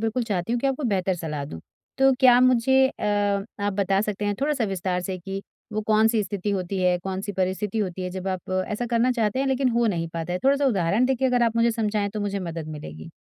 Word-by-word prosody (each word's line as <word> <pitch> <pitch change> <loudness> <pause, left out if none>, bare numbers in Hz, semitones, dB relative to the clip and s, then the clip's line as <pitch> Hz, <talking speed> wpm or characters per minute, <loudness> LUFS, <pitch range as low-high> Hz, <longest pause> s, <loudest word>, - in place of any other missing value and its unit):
बिल्कुल 225 +2 0
चाहती 200 -1 -2
हूँ 240 - 0
कि 275 - 0
आपको 270 +1 -1
बेहतर 190 -2 0
सलाह 155 -4 -4
दूँ। 80 -12 -8 0.4
तो 270 0 +5
क्या 250 -2 +7
मुझे 255 +1 +4
अ, 265 - -7 0.6
आप 205 0 0
बता 195 0 +1
सकते 210 -1 -2
हैं 205 0 0
थोड़ा-सा 285 -4 +1
विस्तार 185 -2 -2
से 185 0 -4
कि 195 +2 -6 0.3
वो 215 - -1
कौन-सी 220 +1 +3
स्थिति 200 +1 -3
होती 190 -1 -2
है, 180 -1 +3
कौन-सी 190 +3 -4
परिस्थिति 190 +3 -1
होती 185 -3 -2
है 180 - -3
जब 185 +1 -5
आप 185 - -9 0.2
ऐसा 215 +3 -3
करना 235 +2 +3
चाहते 225 -1 0
हैं 270 - +1
लेक़िन 265 0 +2
हो 235 -1 +2
नहीं 170 -6 -1
पाता 165 +1 -3
है? 180 - -1
थोड़ा-सा 280 +1 +3
उदाहरण 200 -1 +2
देके 265 0 0
अगर 250 -1 +2
आप 230 -1 +1
मुझे 230 0 +4
समझाएँ 215 -3 -1
तो 215 +1 -4
मुझे 200 -1 -2
मदद 165 -4 -5
मिलेगी। 80 - -8
205 Hz, 230 wpm, -24 LUFS, 185-235 Hz, 0.6 s, क्या